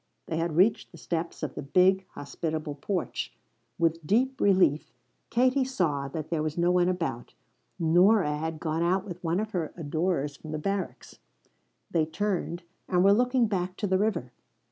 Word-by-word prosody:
They 160 - -3
had 165 -1 -1
reached 195 +6 +3
the - - -13
steps 170 -1 -4
of 155 - -3
the - - -5
big, 185 +6 +3
hospitable 155 +1 -4
porch. 175 +5 -3 0.4
With 165 -1 0
deep 260 +7 +1
relief 185 -7 +3 0.4
Katie 255 +3 +3
saw 165 - -1
that 155 +3 -6
there 160 -2 0
was 155 +1 -3
no 175 +1 +3
one 180 0 +3
about. 165 -10 -3 0.4
Nora 175 0 +4
had 160 +1 -4
gone 160 0 -1
out 185 +3 +1
with 180 -3 -8
one 170 +2 +1
of 215 0 -3
her 170 -6 -2
adorers 155 -2 -1
from 155 +1 -9
the - - -1
barracks. 195 +5 -4 0.7
They 160 -2 +2
turned, 180 -1 -2 0.2
and 180 0 +2
were 200 +1 +6
looking 250 +2 +3
back 185 -3 -2
to 210 - -2
the 190 -1 +2
river. 205 - -1
175 Hz, 170 wpm, -28 LUFS, 155-195 Hz, 0.7 s, were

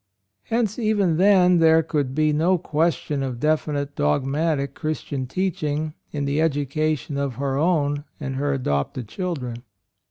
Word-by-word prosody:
'' 100 +1 -55
Hence 225 -1 -1
even 205 -7 +2
then 180 -2 +5
there 160 0 +5
could 145 -4 -2
be 155 0 +2
no 170 +5 +3
question 155 -2 -1
of 130 -3 -3
definite 145 -1 0
dogmatic 140 - 0
Christian 145 -4 -3
teaching 155 -2 -2 0.2
in 145 -2 -2
the 140 +2 0
educa 155 0 +1
tion 140 +1 -5
of 140 -3 -2
her 135 -1 -2
own 145 -2 +1
and 135 -3 -4
her 145 +1 0
adopted 120 - -2
children. 130 - -4
150 Hz, 150 wpm, -23 LUFS, 140-165 Hz, 0.2 s, then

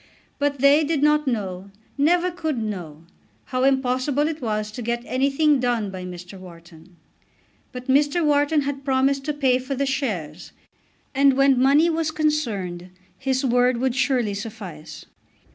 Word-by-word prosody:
But 285 0 0
they 285 +3 +5
did 300 -1 -1
not 300 0 +3
know, 195 -5 -3 0.3
never 345 +5 +2
could 320 -5 -3
know, 175 -8 -6 0.4
how 255 -1 -2
impossible 265 +2 +1
it 320 -2 -5
was 215 -2 -2
to 245 - -7
get 235 +1 -2
anything 275 +3 +2
done 240 -5 -1
by 185 -1 -7
Mr. 180 +1 -9
Wharton. 170 -1 -15 0.8
But 250 -1 -8
Mr. 290 +5 +2
Wharton 290 +1 +2
had 280 0 -4
promised 270 0 +1
to 300 - -1
pay 265 -3 +2
for 260 +2 -4
the 280 +2 -1
shares, 195 - -4 0.6
and 275 0 +4
when 270 -1 +3
money 285 +5 +5
was 325 -1 -1
concerned 220 - -2 0.3
his 265 0 -1
word 250 0 +2
would 255 +1 0
surely 255 -5 +1
suffice. 190 -8 -8
260 Hz, 150 wpm, -23 LUFS, 210-285 Hz, 0.8 s, they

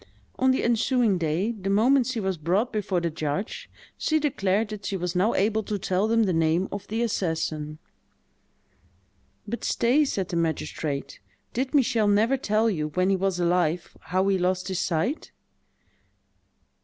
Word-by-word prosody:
On 260 - +4
the 260 - +2
ensuing 235 -3 +2
day, 170 +7 0
the 195 -4 -5
moment 240 +6 +4
she 255 -3 -2
was 190 -2 -1
brought 190 +11 0
before 195 -4 0
the 170 -1 -2
judge, 155 +5 -4 0.3
she 315 0 +1
declared 210 -7 0
that 210 -2 -7
she 195 - -2
was 180 0 -3
now 195 +6 +2
able 215 +2 +2
to 210 0 -3
tell 190 +1 0
them 230 0 +3
the 190 -4 +1
name 165 +3 +2
of 200 0 -6
the 225 +2 -1
assassin. 160 -7 -2 1.7
"But 235 +3 -4
stay," 255 +6 +3
said 195 -9 -2
the 170 - -2
magistrate: 160 -3 -3 0.3
"did 260 +4 -2
Michel 240 -6 +3
never 215 +6 +3
tell 220 -4 +1
you, 160 -8 0
when 185 +5 +1
he - - +3
was 190 -1 -1
alive, 175 -1 0
how 185 +2 +1
he 195 -1 +2
lost 185 +1 0
his 185 -1 -2
sight?" 190 - -1
195 Hz, 165 wpm, -26 LUFS, 175-225 Hz, 1.7 s, On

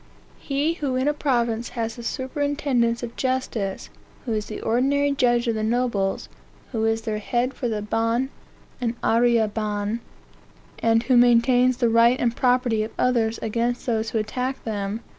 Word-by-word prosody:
He 285 +3 0
who 285 -6 -2
in 260 +2 0
a 295 - +3
province 240 -5 0
has 225 -1 -2
the 240 - -8
superintendence 260 -2 -1
of 235 -1 -6
justice, 255 -7 -2 0.3
who 235 - -1
is 215 -1 -2
the 215 - -6
ordinary 280 +5 +1
judge 240 -3 +2
of 230 - +2
the 215 - -2
nobles, 220 -4 0 0.4
who 225 -3 -1
is 225 0 0
their 215 -2 -2
head 245 +4 -1
for 250 - -3
the 210 -2 -2
ban 230 +5 0 0.5
and 235 -1 -1
arriere 230 -1 +3
ban, 210 +1 -2 0.8
and 225 0 +2
who 245 +1 +3
maintains 245 +1 +4
the 240 - +2
right 230 +2 +4
and 235 -1 0
property 245 -3 +2
of 215 - -2
others 230 -3 +1
against 235 +2 -1
those 225 -2 0
who 225 - -2
attack 250 +5 -3
them... 205 0 -3
235 Hz, 165 wpm, -24 LUFS, 225-255 Hz, 0.8 s, maintains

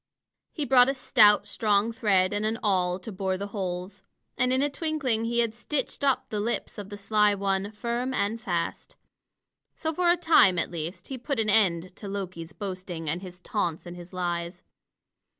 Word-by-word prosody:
He 300 - -3
brought 250 0 +6
a 275 - 0
stout, 210 -5 +5
strong 210 +1 +1
thread 195 -4 +2
and 205 +1 -1
an 220 +1 0
awl 180 -3 +2
to 195 +4 -8
bore 190 -1 -2
the 200 - -4
holes. 185 0 -4 0.3
And 250 +1 +2
in 260 +2 +3
a - - +3
twinkling 275 -7 -1
he 235 +1 +2
had 230 -2 0
stitched 280 +4 -3
up 275 -2 +1
the 210 - -1
lips 230 0 -3
of 200 -1 -7
the 205 - -7
sly 210 0 +2
one, 195 0 -1
firm 235 +4 -3
and 220 -1 -1
fast. 175 -5 -3 0.8
So 320 0 -3
for 350 +2 +2
a 350 - +4
time, 320 - +5
at 170 - 0
least, 170 +2 -6
he 265 -2 -5
put 275 0 -2
an 215 -1 +2
end 185 -4 +2
to 205 - -8
Loki's 185 -4 -5
boasting 185 -5 -6
and 175 +3 -3
his 180 -1 -10
taunts 175 -5 -2
and 175 0 -8
his 175 0 -11
lies. 175 -1 -3
205 Hz, 190 wpm, -27 LUFS, 185-235 Hz, 0.8 s, brought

